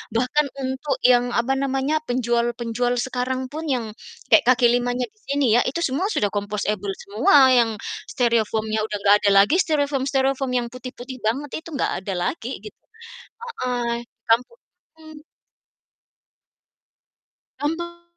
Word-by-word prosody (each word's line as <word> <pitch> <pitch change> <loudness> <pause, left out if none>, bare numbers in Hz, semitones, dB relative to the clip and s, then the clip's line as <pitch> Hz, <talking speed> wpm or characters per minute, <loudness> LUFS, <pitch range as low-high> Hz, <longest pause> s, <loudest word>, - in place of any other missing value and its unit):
bahkan 255 +5 +2 0.2
untuk 265 +2 -2
yang, 245 -1 +4
apa 235 +3 +1
namanya, 270 +3 0
penjual-penjual 240 0 0
sekarang 260 +1 -2
pun 315 +2 -5
yang, 250 -4 0 0.5
kayak 305 - +7
kaki 245 -1 +5
limanya 245 +1 0
di 430 - -34
sini 280 -1 +1
ya, 245 - +5
itu 275 +6 -2
semua 300 +9 0
sudah 210 - +1
compostable 205 -1 -2
semua 210 +8 +2 0.2
yang 240 -2 +4 0.4
styrofoam-nya 220 -2 0
udah 210 - -3
nggak 205 0 +6
ada 200 - +4
lagi 295 +12 +1
styrofoam-styrofoam 275 -3 0
yang 240 -1 -1
putih-putih 255 +1 -8
banget 275 +7 -2
itu 335 - -12
nggak - - 0
ada 195 0 -4
lagi 270 -5 -4
gitu, 425 - -11 0.9
heeh, 240 -1 -2 0.2
kan 225 0 +6
untuk 475 - -24 0.4
hmm. 310 -1 -13 2.4
Bantu 345 +3 -3
255 Hz, 130 wpm, -22 LUFS, 235-280 Hz, 2.4 s, kayak